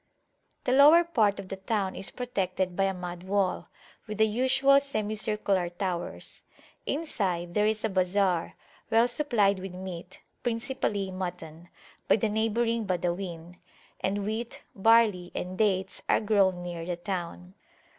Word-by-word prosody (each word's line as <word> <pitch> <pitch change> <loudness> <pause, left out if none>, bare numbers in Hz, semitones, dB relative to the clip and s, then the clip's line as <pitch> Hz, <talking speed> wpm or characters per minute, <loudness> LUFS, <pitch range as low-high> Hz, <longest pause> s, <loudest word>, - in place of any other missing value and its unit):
The - - 0
lower 295 +6 +7
part 220 -12 +1
of 190 -1 -8
the 195 - -5
town 195 -1 -2
is 195 - -2
protected 190 -7 -2
by 195 - +2
a 195 - 0
mud 180 -1 -6
wall, 190 0 -1 0.4
with 215 -1 -5
the 220 - +5
usual 260 +5 +4
semicircular 210 -7 -1
towers. 175 0 -4 0.5
Inside 190 - -2
there 210 +2 +3
is 215 0 0
a - - 0
bazar, 185 -2 +1 0.3
well 230 +2 +4
supplied 235 -7 +2
with 185 -1 -7
meat 185 -2 -8 0.2
(principally 230 -4 -2
mutton) 175 -3 -6 0.4
by - - +6
the 220 +1 0
neighbouring 225 +1 0
Badawin; 175 -1 -3 0.4
and 200 +1 -1
wheat, 220 +3 -4
barley, 210 -4 +3
and 180 +1 -4
dates 190 -2 0
are - - +4
grown 195 -4 +2
near 175 -1 -5
the 175 +1 -3
town. 180 0 -5
195 Hz, 140 wpm, -28 LUFS, 180-220 Hz, 0.5 s, lower